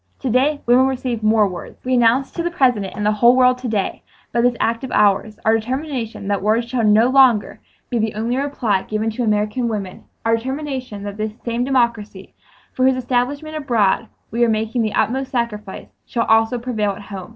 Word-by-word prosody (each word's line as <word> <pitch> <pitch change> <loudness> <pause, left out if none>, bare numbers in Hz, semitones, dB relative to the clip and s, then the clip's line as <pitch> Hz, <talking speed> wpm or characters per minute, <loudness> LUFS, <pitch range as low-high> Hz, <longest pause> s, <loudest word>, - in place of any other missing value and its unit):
To 260 - -1
day 285 +4 +2
women 250 +2 +5
receive 255 -3 -3
more 215 -1 +3
words. 180 -2 -8
We 255 - 0
announce 245 +2 +3
to 340 - -4
the 345 - -1
President 250 - +1
and 210 - -2
the 210 - +3
whole 235 +4 +4
world 255 0 +4
to 250 - -5
day, 210 -4 -2 0.3
by 235 - +1
this 245 0 +2
act 230 +2 0
of 260 - -5
ours, 210 +1 +2
our 220 - +4
determination 245 -2 -4
that 200 -1 0
words 220 +3 +1
shall 235 -1 -1
not 220 +4 +4
longer 255 -6 +4 0.3
be 240 - 0
the 220 -1 -1
only 230 +3 -1
reply 255 -8 0
given 215 +2 -2
to 240 +3 -3
American 215 +3 0
women—our 215 +2 -3
determination 260 -4 -5
that 205 0 -6
this 215 0 -3
same 235 0 -1
democracy 235 -7 -1 0.4
for 255 - +1
whose 265 0 +4
establishment 260 +5 -2
abroad 235 -10 +1 0.2
we 235 +2 +1
are 235 - +3
making 225 +2 0
the 215 -2 -1
utmost 260 +5 0
sacrifice, 220 -6 -4 0.2
shall 230 -1 -1
also 225 +2 +3
prevail 220 -4 -2
at 195 - -10
home. 195 -3 -8
235 Hz, 195 wpm, -20 LUFS, 215-255 Hz, 0.4 s, women